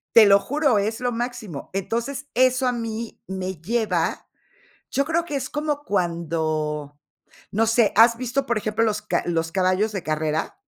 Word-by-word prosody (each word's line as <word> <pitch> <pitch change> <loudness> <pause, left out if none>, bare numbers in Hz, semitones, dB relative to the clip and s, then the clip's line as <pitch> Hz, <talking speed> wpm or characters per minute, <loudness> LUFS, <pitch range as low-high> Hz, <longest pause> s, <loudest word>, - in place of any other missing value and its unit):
Te 225 -2 +10
lo 200 0 +7
juro, 280 +1 +1
es 220 +3 -1
lo 245 -1 -1
máximo. 230 - -5
Entonces, 235 +8 -3
eso 255 +1 +3
a - - +3
mí 230 -1 -5
me 190 0 -4
lleva, 205 -4 -1 0.6
yo 275 - +1
creo 330 +2 0
que 295 -4 -4
es 260 -1 -3
como 295 -1 -2
cuando, 155 - -2 0.5
no 225 +3 +2
sé. 225 -1 +3
¿Has 230 +2 +7
visto, 255 +2 -1
por 235 -3 +1
ejemplo, 215 +2 0
los 210 -1 0
ca - - 0
los 165 -1 -1
caballos 190 +3 +1
de 195 -3 -3
carrera? 155 0 -2
220 Hz, 170 wpm, -23 LUFS, 180-245 Hz, 0.6 s, Te